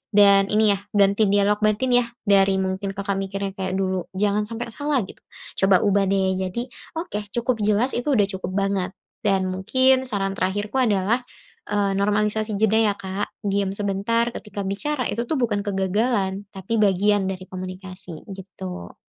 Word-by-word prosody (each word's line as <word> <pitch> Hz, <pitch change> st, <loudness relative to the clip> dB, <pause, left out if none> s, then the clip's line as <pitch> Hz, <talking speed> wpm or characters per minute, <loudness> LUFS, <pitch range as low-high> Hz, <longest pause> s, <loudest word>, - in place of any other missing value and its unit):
dan 200 Hz, -1 st, +6 dB
ini 210 Hz, 0 st, +4 dB
ya 200 Hz, -, 0 dB, 0.2 s
ganti 200 Hz, +1 st, +4 dB
dialog 205 Hz, +1 st, +2 dB
batin 215 Hz, +4 st, +1 dB
ya, 240 Hz, -, 0 dB, 0.2 s
dari 195 Hz, -2 st, +4 dB
mungkin 190 Hz, +1 st, -3 dB
Kakak 200 Hz, -1 st, -2 dB
mikirnya 195 Hz, 0 st, -3 dB
kayak 190 Hz, -1 st, -3 dB
dulu, 190 Hz, -1 st, -1 dB
"Jangan 210 Hz, +1 st, +1 dB
sampai 230 Hz, +1 st, -5 dB
salah," 285 Hz, 0 st, 0 dB, 0.6 s
coba 195 Hz, -1 st, +4 dB
ubah 200 Hz, -1 st, +2 dB
jadi, 190 Hz, +2 st, 0 dB, 0.3 s
"Oke, 210 Hz, -, -4 dB
cukup 240 Hz, +2 st, -1 dB
jelas 215 Hz, +5 st, +3 dB
itu 245 Hz, +4 st, -2 dB
udah 210 Hz, -, +4 dB, 0.2 s
cukup 185 Hz, 0 st, -5 dB
banget." 195 Hz, -2 st, -1 dB, 0.2 s
Dan 195 Hz, -4 st, +1 dB
mungkin 260 Hz, +7 st, +2 dB
saran 195 Hz, -4 st, -1 dB
terakhirku 205 Hz, +6 st, -1 dB
adalah, 215 Hz, -1 st, +2 dB, 0.5 s
eee, 205 Hz, -1 st, +1 dB
normalisasi 210 Hz, +1 st, +1 dB
jeda 220 Hz, +1 st, +3 dB
ya, 215 Hz, -2 st, +3 dB
Kak, 195 Hz, +1 st, -4 dB, 0.2 s
diam 200 Hz, -1 st, 0 dB
sebentar 205 Hz, +4 st, 0 dB
ketika 205 Hz, -1 st, -6 dB
bicara 255 Hz, +9 st, -2 dB
itu 235 Hz, +2 st, -2 dB
tuh 315 Hz, -, 0 dB
bukan 230 Hz, -6 st, 0 dB
kegagalan 200 Hz, 0 st, 0 dB
tapi 195 Hz, +4 st, -2 dB
bagian 200 Hz, 0 st, +3 dB
dari 190 Hz, -1 st, -4 dB
komunikasi 185 Hz, -2 st, -8 dB
gitu. 95 Hz, -, -8 dB
200 Hz, 155 wpm, -23 LUFS, 190-215 Hz, 0.6 s, dan